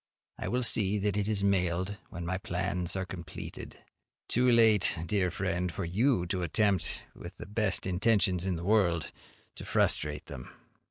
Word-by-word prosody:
I - - -4
will 125 +1 0
see 105 -3 +3
that 100 -1 0
it 105 -1 0
is 105 -2 0
mailed 95 0 0
when 85 -1 -6
my 95 +2 -2
plans 90 -1 -2
are 95 -1 -2
completed. 85 -2 -8 0.5
Too 125 +2 +3
late, 110 -6 +5
dear 95 -2 +1
friend, 90 0 -2
for 80 - -4
you 100 +2 +1
to 90 +1 -2
attempt, 95 +3 0
with - - -10
the - - -8
best 105 -1 -1
intentions 95 -1 +2
in 95 -1 -1
the 85 - -5
world, 90 -7 +2 0.5
to - - -7
frustrate 75 0 0
them. - - -9
95 Hz, 165 wpm, -30 LUFS, 90-105 Hz, 0.5 s, late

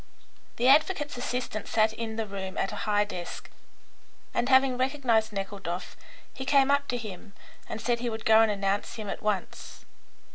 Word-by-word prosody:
The 245 - +1
advocate's 295 +1 +4
assistant 245 -3 -3
sat 220 0 +2
in 225 -1 -5
the 225 0 -2
room 195 -2 -6
at 195 - 0
a - - -5
high 205 0 +4
desk, 180 -4 -7 0.8
and 240 +2 0
having 265 -1 +5
recognised 255 -4 +1
Nekhludoff, 195 -3 -5 0.4
he 265 - -6
came 275 0 +4
up 285 0 +2
to 245 - -1
him 210 -2 -8 0.4
and - - -4
said 235 +2 0
he 240 0 -2
would 220 0 -6
go 220 0 +7
and 225 - +4
announce 200 0 -1
him 215 -3 -6
at - - -6
once. 210 -3 -3
220 Hz, 175 wpm, -28 LUFS, 205-255 Hz, 0.8 s, go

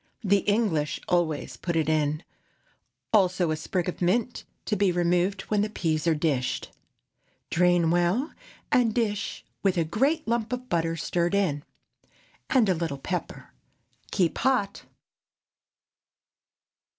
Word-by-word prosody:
The 200 0 +4
English 185 -9 +1
always 170 -4 0
put 170 -2 -3
it 160 -2 +1
in, 155 0 +1 0.9
also 185 -5 +3
a - - +1
sprig 175 +3 -2
of 180 - -4
mint, 230 +7 0 0.2
to 210 - 0
be 200 -2 +2
removed 180 +3 +1
when 210 -1 0
the 210 - 0
peas 160 -5 -1
are 165 - +4
dished. 145 -5 -1 0.8
Drain 175 -1 +3
well, 175 - +1 0.4
and 235 -4 +3
dish, 210 -4 -2 0.2
with 195 -3 +1
a 170 - +3
great 270 - 0
lump 230 0 0
of 250 0 -4
butter 165 -1 0
stirred 170 +3 0
in, 155 -8 0 0.9
and 250 -5 +4
a 190 - +3
little 160 -4 -3
pepper. 135 - -5 0.6
Keep 180 -5 0
hot. 225 -7 0
180 Hz, 130 wpm, -26 LUFS, 165-210 Hz, 0.9 s, The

